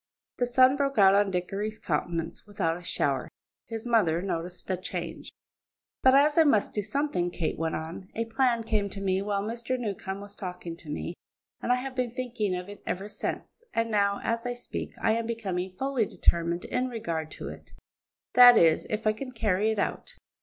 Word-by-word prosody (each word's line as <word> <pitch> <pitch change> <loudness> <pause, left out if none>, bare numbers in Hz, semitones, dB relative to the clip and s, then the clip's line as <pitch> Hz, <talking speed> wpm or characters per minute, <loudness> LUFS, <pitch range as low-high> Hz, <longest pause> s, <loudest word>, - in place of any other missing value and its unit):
The 245 - +2
sun 255 +2 +5
broke 275 -2 0
out 195 -2 +7
on 200 0 +4
Dickory's 195 +4 -2
countenance 165 +2 -3
without 165 -5 -1
a 175 - -8
shower; 135 -6 -1 0.4
his 225 0 -5
mother 205 -9 +3
noticed 175 -1 -4
the 185 - 0
change. 185 - -6 0.7
"But 260 0 +6
as 295 +3 +5
I - - +8
must 225 -9 +3
do 210 - 0
something," 210 -5 0
Kate 175 -2 -2
went 165 0 -1
on, 165 +4 -6
"a 230 - -1
plan 235 0 +1
came 210 -3 0
to 195 - -8
me 190 -1 +1
while 200 0 -1
Mr. 235 +3 -2
Newcombe 200 -4 -4
was 205 0 -8
talking 180 -2 -6
to 165 -3 -13
me, 150 +3 -3 0.5
and - - 0
I - - +6
have 255 +1 -4
been 250 -2 -2
thinking 235 -7 -1
of 180 +1 -5
it 205 0 -10
ever 195 +3 -2
since, 455 - -5
and 230 0 +1
now, 200 -1 +2
as 230 0 -1
I 245 - -2
speak, 245 - -6
I - - +2
am 230 0 -1
becoming 190 -6 -2
fully 265 -5 0
determined 170 +1 +1
in 250 +1 -1
regard 170 -10 -3
to - - -6
it; - - -12 0.6
that 245 -1 +10
is, 165 -2 +4
if 215 +1 -2
I 215 - +4
can 255 +4 -7
carry 215 -3 +1
it 220 - 0
out. 200 - -2
210 Hz, 195 wpm, -28 LUFS, 180-240 Hz, 0.7 s, that